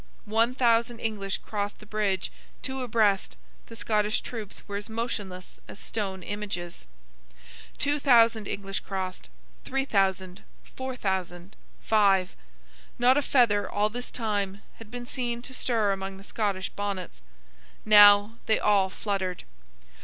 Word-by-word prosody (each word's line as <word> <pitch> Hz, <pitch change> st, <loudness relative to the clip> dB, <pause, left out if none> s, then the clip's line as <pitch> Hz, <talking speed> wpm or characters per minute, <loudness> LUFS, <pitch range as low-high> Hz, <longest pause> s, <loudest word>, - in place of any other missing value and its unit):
One 225 Hz, +3 st, +2 dB
thousand 235 Hz, -1 st, +2 dB
English 205 Hz, -4 st, -2 dB
crossed 205 Hz, -1 st, -3 dB
the 215 Hz, -, -15 dB
bridge, 205 Hz, -3 st, -1 dB, 0.3 s
two 265 Hz, 0 st, -3 dB
abreast; 215 Hz, -5 st, +1 dB, 0.3 s
the 230 Hz, -, -11 dB
Scottish 215 Hz, -1 st, 0 dB
troops 220 Hz, -5 st, -7 dB
were 200 Hz, -1 st, -3 dB
as 205 Hz, +1 st, -7 dB
motionless 205 Hz, -5 st, -5 dB
as -, -, -10 dB
stone 195 Hz, -4 st, -4 dB
images. 175 Hz, -, -5 dB, 0.9 s
Two 290 Hz, +1 st, +1 dB
thousand 230 Hz, -6 st, +4 dB
English 195 Hz, -1 st, -3 dB
crossed; 185 Hz, -, -5 dB, 0.3 s
three 270 Hz, 0 st, -1 dB
thousand, 190 Hz, -5 st, 0 dB, 0.3 s
four 260 Hz, 0 st, -4 dB
thousand, 190 Hz, -3 st, -3 dB, 0.3 s
five. 195 Hz, -4 st, +3 dB, 0.6 s
Not 250 Hz, +2 st, +5 dB
a 290 Hz, -, +3 dB
feather, 235 Hz, -7 st, +3 dB
all 205 Hz, +1 st, +1 dB
this 245 Hz, +3 st, -4 dB
time, 205 Hz, -4 st, -2 dB
had 225 Hz, -2 st, -12 dB
been 245 Hz, +1 st, -7 dB
seen 240 Hz, -1 st, -3 dB
to 260 Hz, -, -7 dB
stir 225 Hz, -5 st, +1 dB
among 195 Hz, 0 st, -4 dB
the 195 Hz, -, -13 dB
Scottish 200 Hz, -3 st, -2 dB
bonnets. 195 Hz, -, -5 dB, 0.6 s
Now, 205 Hz, +1 st, +7 dB
they 220 Hz, -, +4 dB
all 200 Hz, -2 st, +3 dB
fluttered. 190 Hz, -3 st, -3 dB
210 Hz, 135 wpm, -27 LUFS, 195-230 Hz, 0.9 s, Now